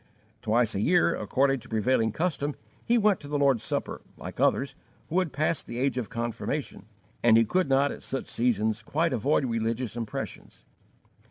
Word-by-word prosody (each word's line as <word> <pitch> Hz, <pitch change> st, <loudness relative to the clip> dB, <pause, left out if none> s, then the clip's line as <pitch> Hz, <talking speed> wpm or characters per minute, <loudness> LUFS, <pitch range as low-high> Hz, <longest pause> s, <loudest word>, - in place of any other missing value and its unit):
Twice 110 Hz, 0 st, +2 dB
a 100 Hz, -, -2 dB
year, 175 Hz, +9 st, +3 dB
according 135 Hz, +6 st, +1 dB
to -, -, -15 dB
prevailing 110 Hz, +1 st, +2 dB
custom, 150 Hz, -, -1 dB, 0.3 s
he 240 Hz, -, +3 dB
went 210 Hz, -4 st, +3 dB
to 145 Hz, -, -10 dB
the 145 Hz, 0 st, -1 dB
Lord's 135 Hz, -5 st, +3 dB
Supper, -, -, -3 dB, 0.2 s
like -, -, -8 dB
others -, -, +2 dB, 0.3 s
who 175 Hz, -, +2 dB
had 180 Hz, -5 st, -1 dB
passed 155 Hz, +2 st, -1 dB
the 120 Hz, -, -6 dB
age 135 Hz, +1 st, +1 dB
of 115 Hz, -, -5 dB
confirmation, 115 Hz, +4 st, -4 dB, 0.3 s
and 115 Hz, -1 st, +6 dB
he 115 Hz, -, +5 dB
could 180 Hz, -, +1 dB
not 135 Hz, +1 st, +3 dB
at -, -, -8 dB
such 135 Hz, -, -4 dB
seasons 110 Hz, -2 st, 0 dB
quite 155 Hz, +7 st, 0 dB
avoid 135 Hz, +4 st, +1 dB
religious 115 Hz, 0 st, -2 dB
impressions. 115 Hz, -2 st, -6 dB
130 Hz, 175 wpm, -27 LUFS, 115-145 Hz, 0.3 s, and